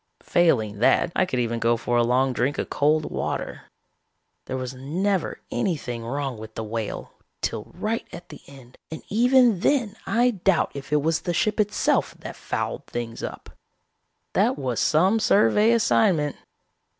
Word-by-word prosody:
Failing 110 -12 +2
that, 145 +8 +3
I 185 - +2
could 130 - -2
even 120 -1 -1
go 115 0 +2
for 120 +1 -2
a 120 - +4
long 130 +2 +2
drink 135 +4 0
of - - -4
cold 150 +1 +1
water. - - -4 0.8
There 130 - -4
was 130 0 -5
never 175 +8 -2
anything 145 - -2
wrong 135 0 -3
with 110 0 -10
the 110 - -4
Whale 110 0 -5 0.3
till 105 - -2
right 215 +5 -3
at 175 - -10
the - - -11
end 130 -3 -15
and 160 - -8
even 245 -1 +4
then 235 -3 +1
I 245 +2 +3
doubt 195 -4 +1
if 140 +1 -8
it 150 -1 +2
was 160 0 +1
the 175 -2 -2
ship 215 +4 0
itself 210 0 +1
that - - -8
fouled - - -4
things 115 -1 -5
up. - - -7 0.8
"That - - +2
was 130 -5 -2
some 185 +8 +3
survey 210 +1 +4
assignment. 190 -9 +2
150 Hz, 160 wpm, -24 LUFS, 120-200 Hz, 0.8 s, a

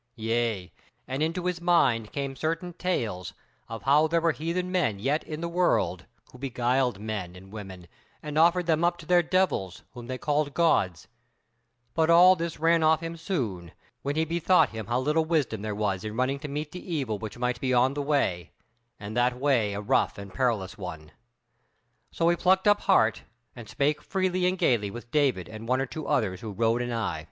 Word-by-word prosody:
Yea, 115 -5 -1 0.3
and 130 +3 -3
into 165 +3 -1
his 180 -1 -2
mind 130 -11 +2
came 140 -1 -4
certain 165 +5 -3
tales 115 - -2 0.4
of 115 -1 -7
how 150 +3 +4
there 170 +1 +2
were 165 0 +2
heathen 170 +5 -3
men 160 - +1
yet 140 +9 0
in 155 0 -6
the 170 - -2
world, 175 +1 0 0.2
who 125 - -14
beguiled 125 -3 0
men 105 -5 -5
and 95 +1 -13
women, 95 -4 -9 0.4
and 150 -1 -6
offered 170 +3 +4
them 160 0 +1
up 175 0 +2
to 165 - -12
their 175 +1 +4
devils, 170 - 0
whom 120 -2 -9
they 130 0 -4
called 145 +1 -1
gods: 95 - +1 0.9
but 160 0 +2
all 180 +2 +8
this 165 -2 -4
ran 165 +1 +3
off 160 +1 +3
him 165 0 -4
soon, 115 - -4 0.3
when 140 +1 -2
he 160 +1 +1
bethought 170 +3 +3
him 110 -2 -7
how 120 +2 0
little 150 +5 +1
wisdom 155 -10 0
there 105 -1 -3
was 100 -2 -1
in 110 0 -5
running 130 +2 0
to 150 - -6
meet 150 +1 -4
the 180 - -8
evil, 115 -8 -2
which 110 0 -7
might 125 0 -2
be 130 - 0
on 130 +2 +3
the 145 - -3
way, 135 - 0 0.5
and 105 +1 -7
that 125 +1 +1
way 125 -7 +2
a 100 - -3
rough 105 - +1
and 100 -1 -9
perilous 105 -7 -1
one. 80 -5 -7 1.0
So 165 - 0
he 175 - +3
plucked 190 +3 +2
up 205 0 +5
heart, 115 - +3 0.3
and 115 -4 -10
spake 140 +7 0
freely 185 -1 0
and 185 +1 0
gaily 115 - +2
with 120 +3 -10
David 135 - +1
and 110 +1 -9
one 130 +2 +2
or 135 - 0
two 155 +3 -7
others 95 -6 0
who 110 -2 -6
rode 115 +3 +1
anigh. 115 -9 -2
135 Hz, 200 wpm, -27 LUFS, 110-165 Hz, 1.0 s, all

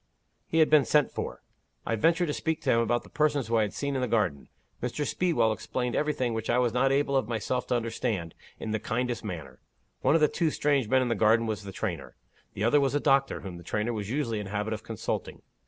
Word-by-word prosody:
"He 160 - -1
had 160 -1 +5
been 150 -2 +7
sent 150 +2 +3
for. - - -5 0.4
I 115 - 0
ventured 165 - +3
to - - 0
speak 160 +1 -2
to - - +2
him 115 - +4
about 120 +1 +1
the - - -15
persons 145 -3 +1
whom 115 +1 +1
I - - +4
had 105 -2 -1
seen 140 0 -2
in 130 - -1
the 125 - 0
garden. 100 - 0 0.3
Mr. 125 +4 -2
Speedwell 165 -13 +1
explained 125 +3 -3
everything 140 -6 0
which 110 0 -4
I 120 - +3
was 125 -2 +2
not 135 +2 +3
able 140 0 +1
of 130 -5 +2
myself 120 +2 -2
to 125 - +1
understand, 115 -7 -2 0.3
in 110 - -4
the 110 - 0
kindest 125 +2 -2
manner. 80 -11 -7 0.4
One - - +3
of 165 - +3
the 150 - +6
two 165 +1 0
strange 145 -5 +1
men 130 +1 +4
in - - -1
the - - +2
garden 115 +1 +3
was 110 -2 -3
the 100 - -6
trainer; - - -4 0.4
the 100 - -3
other 120 +6 +4
was 135 0 +1
a - - +3
doctor, 135 -1 +2
whom 95 -3 -7
the 85 - -11
trainer 105 +6 -1
was 105 -2 -4
usually 115 -5 -1
in 105 - -5
the 95 - -8
habit 105 +2 -1
of 105 - -5
consulting. 110 -2 -4
120 Hz, 250 wpm, -28 LUFS, 110-140 Hz, 0.4 s, been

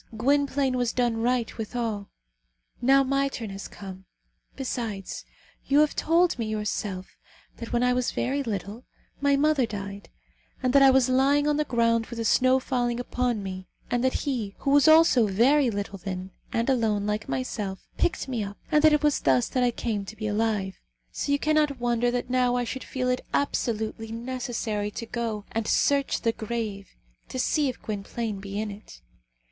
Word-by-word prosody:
Gwynplaine 275 +2 +2
has 245 -2 0
done 240 -2 +1
right, 240 0 0
withal. 220 -2 -3 0.7
Now 270 +2 +5
my 275 +1 +1
turn 230 -6 -5
has 195 0 -7
come. 190 -1 -10 0.5
Besides, 230 -7 -4 0.4
you 280 - +3
have 305 - +2
told 335 -3 +2
me 225 - -1
yourself, 210 -3 -3 0.5
that 230 - -7
when 240 0 +1
I 250 0 +3
was 250 -1 0
very 275 +3 -1
little, 215 -1 -4 0.4
my 280 0 +3
mother 285 -3 +2
died, 200 -1 -7 0.5
and 255 0 +2
that 280 - +6
I 270 - +8
was 265 -1 +4
lying 275 +3 +3
on 295 -1 +2
the 300 - +1
ground 230 -3 +1
with 235 - -8
the 230 - -2
snow 255 +3 +4
falling 245 -2 -1
upon 245 -3 -1
me, 185 -1 -6 0.2
and 245 0 +1
that 260 - +2
he, 230 -8 -2
who 275 - +1
was 290 +1 +5
also 315 -8 +6
very 250 +7 +4
little 200 -2 -4
then, 185 0 -5 0.2
and 230 0 0
alone, 220 -6 +1
like 210 +1 -2
myself, 190 - -3
picked 345 - 0
me 245 -5 -2
up, 200 0 -7
and 300 -1 +4
that 310 -1 +7
it 300 - +2
was 295 -1 +3
thus 130 -3 +2
that 255 - +1
I 245 - +4
came 225 -3 -2
to 220 - -9
be 215 0 -5
alive; 210 -3 -1 0.3
so - - -3
you 285 - +4
cannot 300 -2 +1
wonder 240 0 +1
that 245 0 -2
now 250 -1 +2
I 245 - +1
should 255 +2 -5
feel 255 -1 -3
it 250 0 0
absolutely 225 -4 -1
necessary 230 -3 -3
to 230 +2 -6
go 225 -3 -3
and 225 -1 -2
search 280 -1 +2
the 230 - +2
grave 220 -3 -4 0.4
to - - -5
see 285 +2 +1
if 250 - -6
Gwynplaine 215 0 -4
be 200 +1 -5
in 215 -1 -3
it. 200 - -12
235 Hz, 185 wpm, -26 LUFS, 210-265 Hz, 0.7 s, I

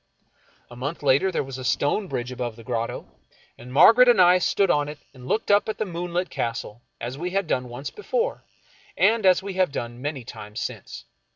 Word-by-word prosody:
A - - -10
month 145 +6 -5
later 140 +7 +3
there 170 - -1
was 135 -1 -8
a - - -6
stone 145 +10 0
bridge 125 -6 -4
above 120 -2 -4
the 115 - -13
grotto, 115 -1 -3 0.5
and 125 +2 -12
Margaret 230 - +7
and 240 - +5
I 180 0 +6
stood 195 +1 +2
on 145 0 +1
it 150 - -8 0.2
and 125 -2 -12
looked 215 +5 0
up 205 +1 +3
at 220 - -3
the 215 - -1
moonlit 175 0 -3
Castle, 115 -1 -4 0.2
as 125 +4 -6
we 175 +2 -2
had 195 +1 -1
done 125 -5 -2
once 125 +4 -6
before, 485 +3 -2 0.5
and 215 +1 +3
as 185 0 +4
we 200 -1 -5
have 185 -4 +1
done 120 -2 -5
many 145 -2 -4
times 105 -2 -9
since. - - -6
145 Hz, 205 wpm, -24 LUFS, 125-190 Hz, 0.5 s, Margaret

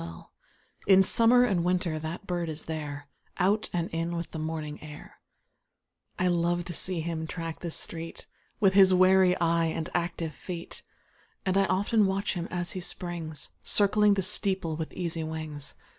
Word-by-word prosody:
B - - -5
I - - -6
li - - -9 0.7
(88) 195 - +7
In 190 - +6
summer 235 +4 +5
and 190 -8 +1
winter 180 -3 0
that 160 +5 -6
bird 175 -3 -2
is 155 0 -5
there, 145 -3 -5 0.3
Out 200 +4 +1
and 170 -1 -1
in 165 +1 -2
with 170 -1 -5
the 160 - -5
morning 155 -1 -4
air: 150 -1 -11 1.0
I 180 - +1
love 175 0 +1
to 175 - -5
see 180 0 0
him 160 -1 -3
track 165 -1 -5
the 175 - -4
street, 165 0 -6 0.3
Witli 195 -3 +5
his 190 -1 +7
wary 185 0 +5
eye 170 0 +2
and 160 0 -3
active 170 -2 -2
feet; 170 +3 -7 0.6
And 185 0 +1
1 195 0 +3
often 205 +2 +2
watch 195 +1 -1
him 175 -1 -4
as 175 -1 -2
he 185 - -4
springs. 170 -4 -5
Circling 205 0 +4
the 195 - 0
steeple 185 -4 +1
with 160 0 -5
easy 170 -2 -3
wings. 155 -2 -6
175 Hz, 180 wpm, -28 LUFS, 160-190 Hz, 1.0 s, 88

